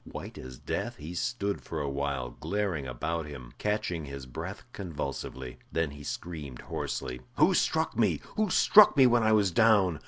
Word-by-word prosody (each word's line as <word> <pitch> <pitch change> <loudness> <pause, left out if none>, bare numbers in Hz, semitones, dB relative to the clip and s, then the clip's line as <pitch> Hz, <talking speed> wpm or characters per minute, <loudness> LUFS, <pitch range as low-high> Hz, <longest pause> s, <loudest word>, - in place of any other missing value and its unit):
White - - -8
as 65 -1 -9
death, - - -3
he 75 +4 -8
stood 100 +1 -2
for 80 - -5
a 75 - -2
while 70 -3 -2
glaring 95 -9 -1
about 80 +6 -3
him, 65 -5 -9
catching 105 -7 -1
his 70 -1 -7
breath 65 - -6
convulsively. 70 -7 -5
Then 80 -3 0
he 75 0 -10
screamed 75 -5 -6
hoarsely. 65 0 -4
"Who - - +5
struck - - +1
me? - - +2 0.2
Who 215 -2 +1
struck 205 -3 +7
me 135 - +8
when 120 -1 +5
I 110 0 +4
was 100 -3 +3
down? 100 -5 +4
80 Hz, 175 wpm, -29 LUFS, 70-105 Hz, 0.2 s, me